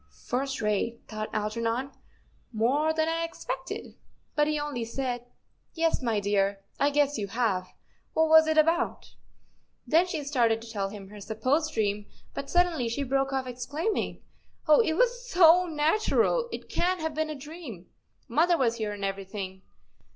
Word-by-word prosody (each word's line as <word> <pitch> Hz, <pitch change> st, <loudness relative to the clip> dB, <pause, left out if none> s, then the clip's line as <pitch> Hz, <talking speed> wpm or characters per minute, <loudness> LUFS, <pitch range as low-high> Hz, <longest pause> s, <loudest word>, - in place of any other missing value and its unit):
"First 270 Hz, 0 st, -2 dB
rate," 210 Hz, +3 st, 0 dB
thought 215 Hz, 0 st, -5 dB
Algernon; 230 Hz, +5 st, -1 dB, 0.6 s
"more 260 Hz, +8 st, +2 dB
than 315 Hz, 0 st, +1 dB
I 330 Hz, 0 st, 0 dB
expected." 330 Hz, -, -5 dB, 0.4 s
But 295 Hz, 0 st, +2 dB
he 305 Hz, -1 st, 0 dB
only 290 Hz, -5 st, -3 dB
said: 245 Hz, +1 st, -3 dB, 0.5 s
"Yes, 330 Hz, -2 st, +1 dB
my 230 Hz, -4 st, +1 dB
dear, 200 Hz, -1 st, +1 dB, 0.2 s
I 285 Hz, -, +4 dB
guess 290 Hz, -3 st, +2 dB
you 200 Hz, -, -2 dB
have. 200 Hz, -4 st, 0 dB, 0.5 s
What 320 Hz, 0 st, +4 dB
was 315 Hz, 0 st, +7 dB
it 315 Hz, 0 st, +1 dB
about? 330 Hz, +3 st, +2 dB, 0.4 s
" -, -, -43 dB
Then 335 Hz, +3 st, +4 dB
she 320 Hz, -4 st, -3 dB
started 240 Hz, -6 st, +2 dB
to 230 Hz, -, -10 dB
tell 200 Hz, -3 st, -2 dB
him 195 Hz, -1 st, -9 dB
her 210 Hz, 0 st, -11 dB
supposed 260 Hz, +10 st, 0 dB
dream, 210 Hz, -1 st, 0 dB, 0.3 s
but 280 Hz, 0 st, -5 dB
suddenly 350 Hz, -9 st, +2 dB
she 260 Hz, +5 st, -2 dB
broke 270 Hz, 0 st, 0 dB
off, 265 Hz, -1 st, -1 dB
exclaiming, 285 Hz, -, -3 dB, 0.2 s
" -, -, -38 dB
Oh, 305 Hz, -, +7 dB
it 385 Hz, -9 st, +3 dB
was -, -, +1 dB
so 360 Hz, -3 st, +6 dB
natural, 425 Hz, +9 st, +2 dB
it -, -, -6 dB
can't 365 Hz, +1 st, 0 dB
have 320 Hz, -1 st, -2 dB
been 315 Hz, +1 st, -1 dB
a 305 Hz, -, -4 dB
dream. 280 Hz, -, -9 dB, 0.4 s
Mother 335 Hz, +8 st, +3 dB
was 235 Hz, -4 st, +1 dB
here 215 Hz, -2 st, -2 dB
and 200 Hz, -1 st, -4 dB
everything. 195 Hz, -1 st, -5 dB
270 Hz, 165 wpm, -28 LUFS, 220-320 Hz, 0.6 s, was